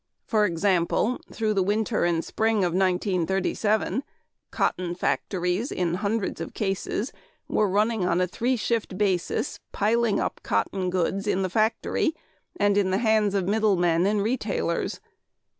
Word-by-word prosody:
For 215 -2 +2
example, 185 +5 +1
through 220 -2 0
the 195 - +2
winter 210 +1 +1
and 170 -1 0
spring 220 -2 +1
of 175 -2 0
1937 190 +5 +1 0.5
cotton 175 -1 -1
factories 180 - -1
in 175 -2 -1
hundreds 205 +2 -1
of - - -6
cases 205 +4 -2 0.3
were 210 -2 +1
running 210 +1 +1
on 175 0 +2
a 180 - +3
three 240 +8 -1
shift 220 -4 -1
basis, 195 +5 0
piling 225 +1 +1
up - - -2
cotton 185 -2 -1
goods 185 +3 -1
in 195 -1 +1
the 185 - -2
factory, 225 - +1 0.4
and 205 -1 +3
in 195 -2 +2
the 190 - +1
hands 215 -2 +2
of 190 -2 0
middle 215 0 +3
men 175 0 +2
and 205 -1 +1
retailers. 245 +5 -1
200 Hz, 145 wpm, -25 LUFS, 185-220 Hz, 0.5 s, a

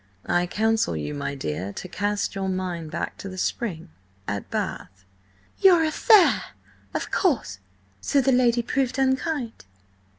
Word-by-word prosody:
"I 175 0 +1
counsel 220 - +1
you, 75 -1 -4
my 75 - -3
dear, 90 - -4
to - - -7
cast 205 +2 -2
your 195 -1 -2
mind 180 -4 -3
back 170 +1 -4
to 195 - -6
the 185 - -8
spring–at 105 - -5
Bath." 95 +1 -4 0.5
"Your 355 -4 +6
affaire! 365 +5 +5 0.5
Of - - -3
course! 240 - 0 0.4
So 280 - +2
the 270 0 +3
lady 245 -2 +3
proved 260 +1 -1
unkind?" 265 -2 -1
195 Hz, 135 wpm, -24 LUFS, -, 0.5 s, Your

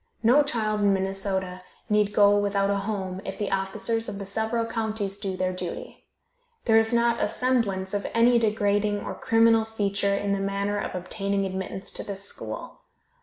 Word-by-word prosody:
No 245 +6 +6
child 215 -7 0
in 200 -1 +4
Minnesota 190 -1 -1 0.3
need 210 -2 +2
go 205 -1 +5
without 200 -1 +1
a 200 - +1
home 190 -3 -3
if 195 - -6
the 205 - -3
officers 195 +4 -1
of 200 - -5
the 200 - -6
several 220 +3 -1
counties 220 -3 -2
do 195 -2 -4
their 185 0 -1
duty. 180 -1 -7 0.6
There 225 -2 +6
is 225 0 +1
not 235 0 +2
a - - +2
semblance 210 -7 0
of 205 0 -1
any 235 +1 +4
degrading 205 -2 +1
or - - -5
criminal 225 0 +3
feature 200 -2 0
in 200 0 -1
the 200 - 0
manner 200 +1 -1
of - - -4
obtaining 195 +2 -2
admittance 190 +1 -5
to - - -7
this 200 -1 -4
school. - - -5
205 Hz, 175 wpm, -26 LUFS, 195-220 Hz, 0.6 s, No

